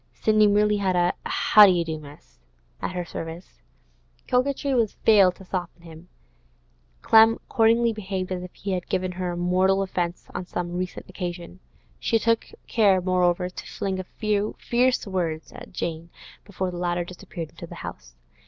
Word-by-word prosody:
Sidney 215 - +4
merely 210 +1 +3
had 190 -2 0
a 175 0 +2 0.2
'How 210 -1 +7
do - - +5
you 170 -1 0
do, 160 -1 -4
miss?' 145 0 -15 0.4
at - - -3
her 180 -1 -3
service. 165 - -8 0.7
Coquetry 275 +2 +1
had 235 -5 +2
failed 195 -5 +4
to 190 - -14
soften 175 -2 -5
him; 165 +1 -13 0.9
Clem 225 0 +7
accordingly 230 0 +2
behaved 190 -3 -4
as 180 -1 -2
if 180 0 -8
he 200 - -5
had 180 -2 -3
given 185 -1 -1
her 180 -1 -3
mortal 185 +2 +2
offence 175 -2 -3
on 180 - -5
some 175 -1 -4
recent 180 0 -4
occasion. 180 -1 -6 0.4
She 225 - +2
took 230 +1 +1 0.2
care, 200 -5 +3
moreover, 180 -1 +1
to 180 - -9
fling 190 -1 -3
a - - -3
few 210 +2 -2
fierce 250 +1 +1
words 170 -5 -3
at - - -11
Jane 170 -2 -4 0.4
before 190 -2 -3
the 175 - -7
latter 175 0 -1
disappeared 170 -2 -8
into - - -10
the - - -10
house. - - -9
185 Hz, 170 wpm, -25 LUFS, 175-210 Hz, 0.9 s, How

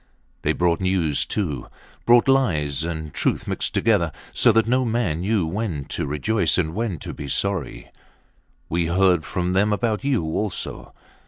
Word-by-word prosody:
They - - +1
brought 85 -1 +1
news, 90 -6 +1
too. 75 - -3 0.4
Brought 120 +2 +6
lies 80 - +2
and 80 -3 -5
truth - - -1
mixed - - -3
together, - - +2 0.2
so 120 - +4
that 115 0 +3
no 130 +3 +2
man 110 -9 -1
knew 100 -1 +1
when 85 -5 -3
to - - -3
rejoice 80 +6 +1
and 80 -4 0
when 110 -4 -2
to - - -7
be 70 - -7
sorry. 95 0 -2 0.8
We 85 0 0
heard 90 -1 +3
from 90 +4 -2
them 105 +3 +3
about 110 +1 0
you 135 -9 +1
also. 90 +6 -4
95 Hz, 160 wpm, -23 LUFS, 80-110 Hz, 0.8 s, Brought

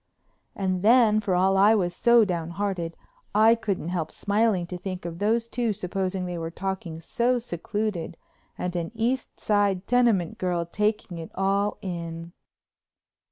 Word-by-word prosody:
And 185 -2 -1
then, 220 0 +5
for 200 -4 0
all 190 +2 +3
I 205 +3 +6
was 175 -4 0
so 235 +1 +5
downhearted, 170 0 -3 0.4
I 220 +2 +7
couldn't 200 -7 -2
help 170 -3 -2
smiling 205 -3 +1
to 180 +1 -6
think 185 -1 -6
of 170 0 -6
those 225 +3 +1
two 230 -1 -1
supposing 185 0 -3
they 175 -1 -4
were 165 0 -3
talking 185 -2 -4
so 240 +9 0
secluded 205 -3 -3 0.4
and 180 0 -3
an 170 -1 -2
East 240 +3 -2
Side 200 -3 +1
tenement 230 -9 +2
girl 175 -2 0
taking 210 -1 -1
it 165 - -7
all 200 +2 +1
in. 170 -2 -5
195 Hz, 150 wpm, -26 LUFS, 175-215 Hz, 0.4 s, I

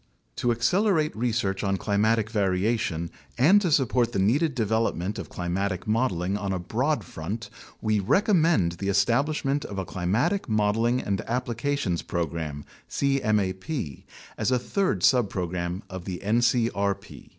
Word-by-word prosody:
To 120 - 0
accelerate 155 - +2
research 110 -4 -1
on 100 -1 +1
climatic 110 +2 +1
variation, 95 -4 0 0.3
and 175 +12 +6
to 180 -5 0
support 125 -4 +2
the - - -1
needed 130 - +2
development 110 -4 0
of - - -7
climatic 90 +1 -2
modeling 100 -5 0
on 100 -2 -3
a 95 - 0
broad 120 - -1
front, 100 +7 -6 0.3
we 110 -1 +1
recom 195 - +3
mend 155 - +3
the 100 - -1
establishment 135 +8 +1
of 100 - -7
a 95 - -2
Climatic 110 - 0
Modeling 110 +3 +2
and 100 -2 -1
Applications 120 -4 -1
Pro 85 -1 -1
gram 75 -2 -5 0.2
(cmap) 110 - -1 0.4
as - - +1
a 130 - +3
third 190 +10 -1
subprogram 90 -5 +1
of 95 -2 -8
the 90 -3 -4
ncrp. 115 -3 0
110 Hz, 140 wpm, -26 LUFS, 95-125 Hz, 0.4 s, and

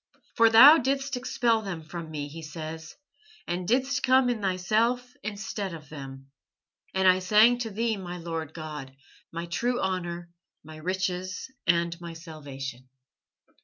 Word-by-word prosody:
"For 230 -1 +6
Thou 270 +8 +10
didst 275 +1 -1
expel 240 -2 +1
them 180 -6 -5
from 165 +1 -7
me," 150 -2 -4
he 160 +3 -9
says, 160 +1 -7 0.5
"and 175 0 -3
didst 260 +3 +1
come 260 -1 +4
in 230 -3 -3
Thyself 220 +7 +1
instead 205 -2 -4
of 155 -3 -12
them. 135 -2 -9 0.6
And 190 0 +3
I 185 0 +6
sang 215 +6 +5
to 235 -2 -3
Thee, 220 +1 -1
my 180 -2 -6
Lord 165 -2 -5
God, 150 -5 -7 0.4
my 170 +1 -4
true 240 +9 -1
honour, 175 -2 -3 0.3
my 155 +1 -11
riches, 185 +5 -3 0.2
and 170 0 +1
my 170 -1 -7
salvation." 135 -6 -8
180 Hz, 145 wpm, -27 LUFS, 160-225 Hz, 0.6 s, Thou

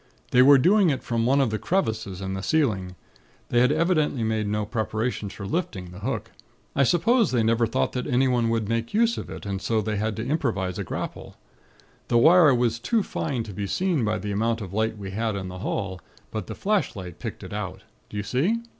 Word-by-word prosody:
They 125 - +6
were 140 +2 +8
doing 185 +6 +4
it 135 - -1
from 115 -1 0
one 135 +2 +4
of 130 -5 +2
the 110 - -2
crevices 110 - -1
in 95 0 -3
the 95 - -3
ceiling. 95 -6 0 0.5
They 120 - +3
had 125 +3 +4
evidently 155 -5 +1
made 110 -1 0
no 105 0 -1
preparations 110 -1 -2
for 100 - -7
lifting 95 - -3
the 90 - -10
hook. 120 +7 -3 0.4
I 140 - +3
suppose 220 - +3
they 120 -3 +1
never 115 +1 +2
thought - - 0
that 125 - -3
anyone 125 -3 +2
would 115 -2 0
make 115 - -2
use 230 +1 +3
of - - -7
it, - - -8
and 100 -1 -3
so 115 -1 +1
they 105 0 -2
had 110 +1 -1
to 110 - -4
improvise 110 - -1
a - - -1
grapple. - - -6 0.7
The 120 - +3
wire 160 +2 +7
was 120 -1 +1
too 225 - +1
fine 135 -10 -2
to 105 - -8
be 100 +1 -3
seen 175 - 0
by 105 0 0
the 105 +1 -4
amount 115 +3 0
of 95 -4 -7
light 110 +1 0
we 100 -2 -6
had 110 +1 -1
in 95 -2 -4
the 90 0 -8
hall; 95 -2 -3 0.3
but 110 - -4
the - - -6
flashlight 105 - -2
'picked - - -6
it - - -8
out.' - - -5 0.3
Do 105 - -7
you 100 - -2
see? 140 - +1
115 Hz, 220 wpm, -25 LUFS, 105-140 Hz, 0.7 s, were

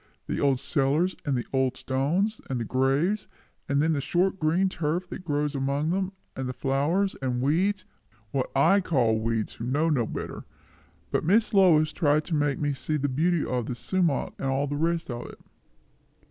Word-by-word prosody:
The - - -3
old 135 -3 +2
cellars 145 +5 +1
and 140 -4 +1
the 120 - -3
old 130 -1 +1
stones, 170 +12 0
and 130 -2 -1
the 115 - -2
graves; 135 - +1 0.4
and 140 +1 +2
then 160 0 +2
the 140 - -1
short 185 +6 +1
green 165 +5 +2
turf 170 0 -2
that - - -7
grows 150 -2 -1
among 140 +3 0
them, 190 +1 -1 0.2
and 130 -1 -3
the - - -3
flowers 150 +10 0
and 125 -2 -1
weeds 185 +9 +1 0.5
what 135 -2 -1
I 195 +9 +5
call 120 -11 +2
weeds, 110 -1 -1
who - - -8
know 150 +5 +1
no 120 -7 +1
better - - -6 0.7
but - - 0
Miss 210 +8 +3
Lois 160 -6 +5
tried 150 -1 +2
to 175 - -4
make 145 -2 +1
me 145 -1 0
see 150 +3 -2
the 145 0 -1
beauty 160 +5 +1
of 125 -3 -2
the 125 - -3
sumach 170 +1 0
and 135 - -2
all 135 +1 +1
the 145 0 -3
rest 165 -1 -1
of 120 0 -5
it." - - -12
145 Hz, 190 wpm, -26 LUFS, 135-175 Hz, 0.7 s, I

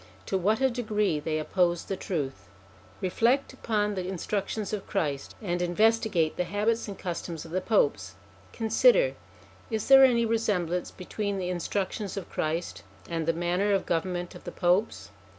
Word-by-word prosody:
To - - -2
what 210 +6 +1
a 265 - +4
degree 210 -8 0
they 155 +1 -2
opposed 175 +2 0
the 195 - -2
truth! 150 -10 -4 0.5
Reflect 235 +9 +1
upon 210 -5 -1
the 185 -2 -3
instructions 200 +3 -3
of 210 - -4
Christ, 145 -8 -2
and 175 -2 -1
investi 220 +6 +2
gate 165 -5 +1
the 180 - +1
habits 210 +6 0
and 200 -2 -6
customs 170 -3 -5
of 160 - -11
the 185 +2 0
Popes. 110 - +1 0.4
Consider: - - +4 0.6
is 220 0 -3
there 270 0 +9
any 235 -3 +5
resemblance 185 -6 0
between 200 +2 -4
the 180 -1 -2
instructions 190 +3 -3
of 195 - -6
Christ 160 +3 -2 0.3
and 165 -2 -3
the - - +5
manner 175 +4 +1
of 195 - +1
government 175 +1 -2
of - - -12
the - - -6
Popes? 180 +4 0
190 Hz, 165 wpm, -28 LUFS, 175-220 Hz, 0.6 s, there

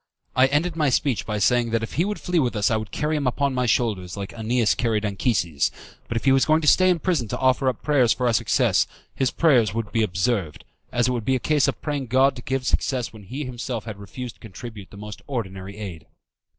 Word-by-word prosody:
I 130 +1 +6
ended 155 +5 0
my 150 -3 +2
speech 130 -1 0
by 105 -1 -1
saying 120 +3 +2
that 115 0 0
if 115 - -5
he 170 - +1
would 210 +1 -3
flee 180 -2 0
with 125 -5 0
us 105 0 +2
I - - +3
would 110 -1 -3
carry 155 +1 -1
him 145 -3 0
upon 140 +2 0
my 125 -1 0
back 100 -5 0
like 100 -1 -5
AEneas 115 0 +1
carried 110 -3 0
Anchises; 95 - 0 0.4
but 115 - -2
if 115 - -4
he 135 - +5
was 135 0 +4
going 155 +1 +3
to 150 - -2
stay 185 +5 +6
in 180 - +3
prison 160 - 0
to - - -3
offer 130 0 +2
up 125 - -5
prayers 135 -6 +3
for 125 - 0
our 120 - +3
success, - - +2 0.3
his 130 -2 +1
prayers 120 - +3
would 115 -2 -3
be 115 - +1
observed, 95 -4 -1 0.3
as 120 0 +2
it - - +1
would 120 -3 -2
be 130 +4 +1
a - - 0
case 150 +2 +2
of - - -3
praying 145 -4 -2
God 130 +3 +3
to 120 - -8
give 130 +1 -2
success 130 -3 0
when 105 -3 -12
he 135 +8 -5
himself 120 -2 -5
had 110 -3 -7
refused 120 +5 -8
to - - -39
contribute 110 -1 -9
the 100 - -13
most 105 0 -8
ordinary 100 -6 -5
aid. 95 -7 -7
120 Hz, 245 wpm, -24 LUFS, 105-135 Hz, 0.4 s, I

